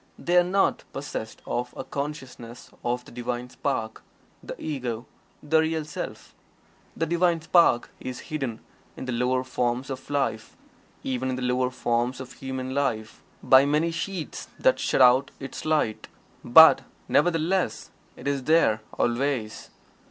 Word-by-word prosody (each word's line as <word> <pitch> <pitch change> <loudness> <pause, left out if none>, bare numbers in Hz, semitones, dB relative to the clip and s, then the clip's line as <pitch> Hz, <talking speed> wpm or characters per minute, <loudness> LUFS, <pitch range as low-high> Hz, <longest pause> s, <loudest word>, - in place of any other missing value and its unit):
They 175 - -1
are 175 - +7
not 195 +2 +1
possessed 110 -5 -6
of 125 +1 -3
a - - -4
consciousness 130 -5 -7
of 125 +1 -2
the - - -14
Divine 125 +1 -4
Spark 115 -6 -3 0.4
the - - -8
Ego 125 -6 -4 0.4
the 160 +2 +3
Real 160 -1 0
Self. 150 - -7 0.6
The 165 - +1
Divine 170 0 +2
Spark 165 -7 +3
is 130 -1 -6
hidden 135 -7 -3 0.4
in - - -6
the 130 - -3
lower 125 +2 +1
forms 125 +1 -2
of 130 0 -7
life 135 -6 -2 0.5
even 130 0 -2
in 130 - -1
the 130 - -4
lower 125 0 +1
forms 125 0 -1
of 130 -1 -8
human 130 -1 -5
life 110 -6 -2 0.2
by 130 0 +7
many 155 +3 +2
sheaths 175 0 -5
that - - +3
shut - - +1
out 130 +2 +5
its 135 -1 -7
light. 155 -9 0 0.4
But, 160 +7 +8 0.3
nevertheless, 175 - +1 0.2
it 125 - -8
is 140 -2 -1
there, 155 -9 +3 0.2
always. 120 -3 -1
130 Hz, 145 wpm, -26 LUFS, 125-155 Hz, 0.6 s, But